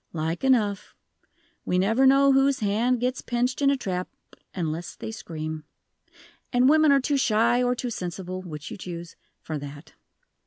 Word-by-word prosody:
"Like 165 +4 -3
enough. 220 -7 +1 0.7
We 180 - 0
never 225 +8 +3
know 275 +1 +6
whose 270 -1 +3
hand 225 +5 +1
gets 250 +2 -1
pinched 245 +3 -1
in 275 - +4
a 280 - +2
trap 185 -6 -3 0.4
unless 165 -1 -4
they - - -6
scream. 155 -7 -6 0.9
And 250 0 +4
women 310 +1 +5
are 280 - +5
too 280 +2 0
shy 235 0 +3
or 250 0 +1
too 245 0 -4
sensible 185 -1 -5
which 150 -5 -8
you - - -6
choose 170 -2 -8 0.3
for 155 -2 -4
that." 145 +2 -10
220 Hz, 160 wpm, -25 LUFS, 175-255 Hz, 0.9 s, know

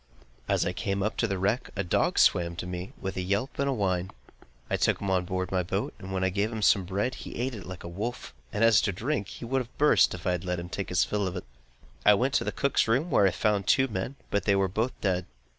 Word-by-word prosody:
As - - +2
I - - -1
came 100 0 -2
up 110 - -1
to 115 - +1
the 100 -2 -2
wreck, 100 +7 0
a 100 - -1
dog 85 - +1
swam 85 -1 +4
to 85 - -5
me 90 +1 -5
with 95 - -4
a - - 0
yelp 100 +8 -2
and 140 0 +1
a - - +2
whine. 95 -6 0 0.6
I - - 0
took - - +1
him 100 -1 -2
on 90 -1 +1
board 95 +1 -3
my 95 -1 +2
boat, 95 +3 -2
and 95 -1 -8
when 95 -1 -1
I 95 - +2
gave 100 +4 0
him 110 -2 -4
some 95 -2 +4
bread 100 +7 -1
he - - -8
ate 125 +2 -2
it 100 -6 -8
like 95 -1 -8
a - - -6
wolf, 100 - -5 0.2
and 105 - 0
as 115 -3 +6
to 100 - 0
drink, 105 +3 -2
he 120 - -8
would 135 +3 0
have 120 0 -11
burst, 150 -8 +4
if 85 - -11
I 90 - +2
had 90 -2 -2
let 90 -1 -2
him 85 0 -7
take 100 +1 -4
his 90 - +3
fill 105 -2 -1
of 90 - -4
it. 90 - -5 0.6
I 105 - +7
went 130 +6 0
to - - +2
the - - -2
cook's 140 -4 +1
room, 135 +10 +1
where 100 -6 +5
I - - +4
found 100 +1 0
two 130 0 +4
men, 105 +6 -3 0.2
but 100 - 0
they 100 - +4
were 95 0 +2
both 110 +7 -2
dead. 90 -3 0
100 Hz, 275 wpm, -28 LUFS, 95-115 Hz, 0.6 s, I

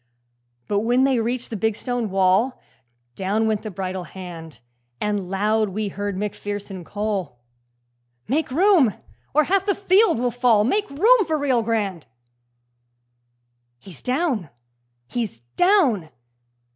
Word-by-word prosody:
But 205 - +1
when 240 +4 +2
they 265 -3 +3
reached 240 +2 -2
the - - -3
big 220 +1 0
stone 245 -2 -3
wall, 195 +6 +2 0.6
Down 205 +4 0
went 215 -2 0
the 215 - -6
bridle 185 -1 -4
hand, 165 -6 -9 0.4
And 205 -3 -2
loud 210 +2 +1
we 210 +2 -3
heard 200 0 -4
Macpherson 205 -2 -5
call, 200 - -3 0.9
'Make 300 +7 0
room, 315 - +4 0.4
or 305 - +6
half 385 +5 +1
the 400 -1 +1
field 395 - +3
will 245 +1 0
fall! 235 -3 +3
Make 405 - 0
room 430 - +4
for 315 -1 +1
Rio 270 -5 +1
Grande!'..... 205 - -2 1.7
'He's 170 +3 -14
down! 250 - -1 0.6
he's 215 - -4
down!' 295 - +3
220 Hz, 130 wpm, -22 LUFS, 195-265 Hz, 1.7 s, or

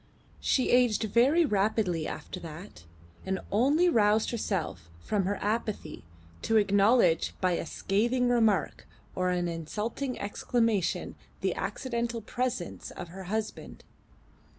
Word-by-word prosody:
She 260 - +1
aged 245 -4 +4
very 255 - +4
rapidly 200 - 0
after - - -6
that, 165 - -10 0.4
and 190 0 -2
only 280 - +3
roused 215 -7 +3
herself 185 - -3
from 200 - -1
her 200 +2 0
apathy 210 -7 -3 0.4
to 225 - +2
acknowledge 200 -3 +3
by 185 -1 +2
a 170 - -2
scathing 240 +9 +1
remark 225 -5 +1 0.3
or 185 0 0
an 180 -1 0
insulting 210 - -4
exclamation 215 -1 0 0.3
the - - +1
accidental 235 -2 -3
presence 245 -6 -3
of 175 - -8
her 190 +2 -9
husband. 215 +3 -4
210 Hz, 120 wpm, -29 LUFS, 185-235 Hz, 0.4 s, aged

